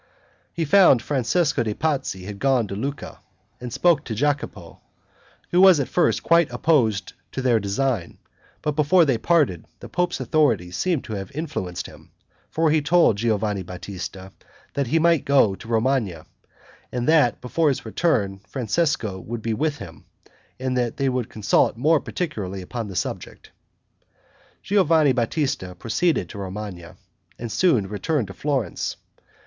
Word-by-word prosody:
He 165 0 -2
found 155 - +5
Francesco 145 +2 +1
de' 110 -2 -2
Pazzi 140 -12 -2
had 100 +1 -8
gone 135 -4 +2
to 100 - -4
Lucca, 140 +7 -5 0.4
and 125 -1 -7
spoke 165 +1 +3
to 110 - -4
Jacopo, 130 - -2 0.7
who 180 - +4
was 190 -5 +7
at 140 - -1
first 175 - +1
quite 170 -1 +4
opposed 120 - +1 0.2
to - - -4
their 125 -3 +2
design, 100 -1 -2 0.5
but 150 - +1
before 160 +4 +4
they 130 -6 +1
parted 145 - +2 0.2
the - - -9
pope's 180 0 -1
authority 115 - +1
seemed 165 - -1
to 110 - -7
have 95 -2 -5
influenced 130 - -4
him; - - -14 0.4
for 160 -1 +1
he 155 0 +3
told 165 - +4
Giovanni 105 -2 0
Batista, 95 +1 -7 0.4
that 140 -2 -1
he 160 - +1
might 165 -1 +3
go 135 -8 +4
to 110 - -11
Romagna, 115 -7 0 0.7
and 125 -1 -2
that 150 -7 +4
before 150 +5 +1
his 135 - -2
return 105 - 0
Francesco 125 - -1
would 110 +3 -6
be 115 - -1
with 150 +5 -1
him, 80 - -11 0.5
and 130 0 -2
they 125 +2 0
would 125 -2 -1
then - - -23
consult 105 +1 +1
more 155 +5 +3
particularly 100 - -4
upon 115 +4 -5
the 95 - -8
subject. - - -5 1.1
Giovanni 165 -7 +3
Batista 125 - -1
proceeded 155 - 0
to 100 - -8
Romagna, 95 -3 -7 0.4
and 115 -1 -6
soon 140 - +2
returned 105 - -2
to - - -7
Florence. 135 - -2
125 Hz, 155 wpm, -23 LUFS, 105-155 Hz, 1.1 s, was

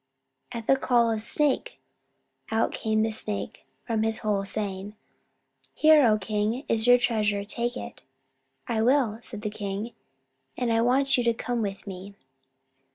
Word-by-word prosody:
At 230 -2 -6
the 270 - +4
call 240 -3 +2
of 220 -1 -2
"Snake!" 300 - 0 0.7
out 225 0 +1
came 220 0 0
the 225 - 0
Snake 215 -1 -4 0.2
from 225 -2 -1
his 220 0 +1
hole, 205 -2 +1
saying, 200 0 -4 0.8
"Here, 310 -1 +6
O 215 -1 +4
King, 215 +6 -2
is 225 +1 +2
your 245 0 +8
treasure; 215 -4 0
take 240 +3 -3
it." 235 - -8 0.7
"I 220 -1 0
will," 240 -3 +2
said 215 -3 -7
the 210 - -2
king. 205 +2 -5 0.6
"And 240 -2 0
I 225 - +3
want 270 +3 +3
you - - +1
to 235 -1 +2
come 240 0 -2
with 200 -2 -4
me." 195 0 -8
225 Hz, 160 wpm, -26 LUFS, 210-245 Hz, 0.8 s, your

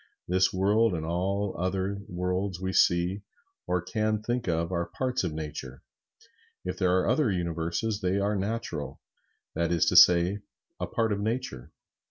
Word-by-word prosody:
This 95 +1 +3
world 100 +2 +2
and 80 -1 -3
all 95 +4 -1
other 95 +2 -1
worlds 90 +1 -2
we 95 0 -3
see 90 +3 +3 0.5
or 90 -1 0
can 110 +2 -1
think 120 0 -2
of 85 0 0
are 85 -1 -1
parts 125 +7 -2
of 90 - -1
Nature. 75 -4 -7 0.8
If 90 0 -4
there 90 -1 +3
are 90 - +1
other 125 -1 +2
Universes, 85 +5 -2
they 95 +1 +1
are 100 +1 0
natural; 100 -6 -3 0.5
that 85 +1 0
is 85 -2 +3
to - - -1
say, 90 +3 +7 0.4
a - - -2
part 115 -1 0
of 100 - 0
Nature. 100 - -3
95 Hz, 160 wpm, -28 LUFS, 85-105 Hz, 0.8 s, say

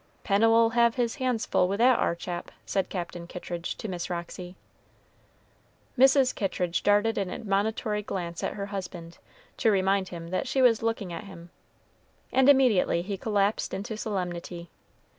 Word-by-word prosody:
"Pennel'll 225 +3 +4
have 235 0 +3
his 240 -1 -1
hands 255 -4 -1
full 180 - +2
with 195 +2 -1
that 245 +2 +4
ar 170 - +1
chap," 175 0 -6 0.2
said 195 -2 -1
Captain 175 -2 -5
Kittridge 175 -1 -5
to - - -5
Miss 180 -3 -4
Roxy. 175 +1 -6 1.4
Mrs. 265 0 +5
Kittridge 180 -3 -1
darted 205 +2 +2
an 195 -2 -2
admonitory 210 +1 -1
glance 175 -4 -5
at - - -1
her 200 - -4
husband, 180 -4 -7 0.4
to 230 - +3
remind 195 -1 +2
him 170 -1 -8
that 185 +9 -2
she 265 - 0
was 240 -4 +5
looking 225 -5 -2
at 170 - -6
him, 175 -3 -12 0.8
and 265 +1 +5
immediately 240 -11 +4
he 200 +2 -3
collapsed 205 +1 0
into 205 +3 -5
solemnity. 175 -5 -4
200 Hz, 155 wpm, -27 LUFS, 180-225 Hz, 1.4 s, Mrs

